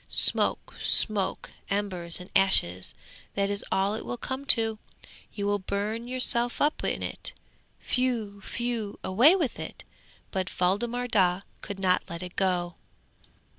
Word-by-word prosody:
Smoke -, -, +3 dB
smoke, 205 Hz, -3 st, 0 dB, 0.2 s
embers 185 Hz, -4 st, 0 dB
and 180 Hz, -, -10 dB
ashes, 95 Hz, -, +5 dB, 0.4 s
that 200 Hz, 0 st, 0 dB
is 205 Hz, -, -2 dB
all 195 Hz, +2 st, +1 dB
it 220 Hz, -, -5 dB
will 245 Hz, -, -5 dB
come 260 Hz, +3 st, -5 dB
to! 225 Hz, -5 st, +5 dB, 0.5 s
You 200 Hz, -, -4 dB
will 205 Hz, 0 st, 0 dB
burn 210 Hz, +5 st, -3 dB
yourself 245 Hz, -1 st, +1 dB
up 295 Hz, +2 st, +1 dB
in -, -, -2 dB
it. -, -, -3 dB, 0.6 s
Whew! 230 Hz, -6 st, -1 dB
whew! 235 Hz, -4 st, -2 dB
away 245 Hz, -, +5 dB
with 315 Hz, -10 st, -2 dB
it! -, -, -8 dB, 0.5 s
But 185 Hz, -1 st, -2 dB
Waldemar 235 Hz, +7 st, 0 dB
Daa 185 Hz, -5 st, +2 dB, 0.2 s
could 200 Hz, -1 st, -6 dB
not 185 Hz, -1 st, +2 dB
let 170 Hz, +2 st, -6 dB
it 180 Hz, 0 st, -9 dB
go. 175 Hz, -3 st, 0 dB
205 Hz, 140 wpm, -27 LUFS, 185-240 Hz, 0.6 s, ashes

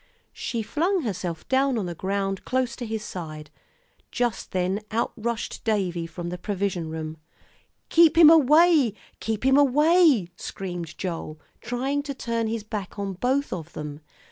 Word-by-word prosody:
She 230 Hz, -2 st, -3 dB
flung 345 Hz, -, 0 dB
herself 180 Hz, -7 st, -4 dB
down 265 Hz, -1 st, +2 dB
on 210 Hz, -, -1 dB
the 175 Hz, -, -4 dB
ground 195 Hz, +2 st, -2 dB
close 255 Hz, -2 st, -1 dB
to 240 Hz, -, -5 dB
his 220 Hz, -1 st, -3 dB
side. 155 Hz, -5 st, -7 dB, 0.6 s
Just 240 Hz, -5 st, -2 dB
then 185 Hz, +3 st, 0 dB
out 225 Hz, +2 st, -1 dB
rushed 235 Hz, 0 st, -4 dB
Davie 180 Hz, -6 st, 0 dB
from 175 Hz, +1 st, -6 dB
the 180 Hz, 0 st, -5 dB
provision 190 Hz, -5 st, -2 dB
room. 160 Hz, 0 st, -5 dB, 0.7 s
"Keep 330 Hz, -1 st, +5 dB
him 325 Hz, -2 st, +10 dB
away, 305 Hz, -, +5 dB, 0.2 s
keep 220 Hz, +2 st, -3 dB
him 265 Hz, +1 st, +5 dB
away," 295 Hz, -, +5 dB
screamed 175 Hz, -4 st, -6 dB
Joel, 165 Hz, -4 st, -5 dB, 0.2 s
trying 260 Hz, +5 st, -1 dB
to 285 Hz, -1 st, -6 dB
turn 230 Hz, -2 st, -2 dB
his 225 Hz, -1 st, -3 dB
back 210 Hz, -3 st, -6 dB
on 200 Hz, -1 st, -3 dB
both 260 Hz, +9 st, 0 dB
of 170 Hz, -2 st, -7 dB
them. 150 Hz, 0 st, -6 dB
215 Hz, 155 wpm, -25 LUFS, 180-265 Hz, 0.7 s, him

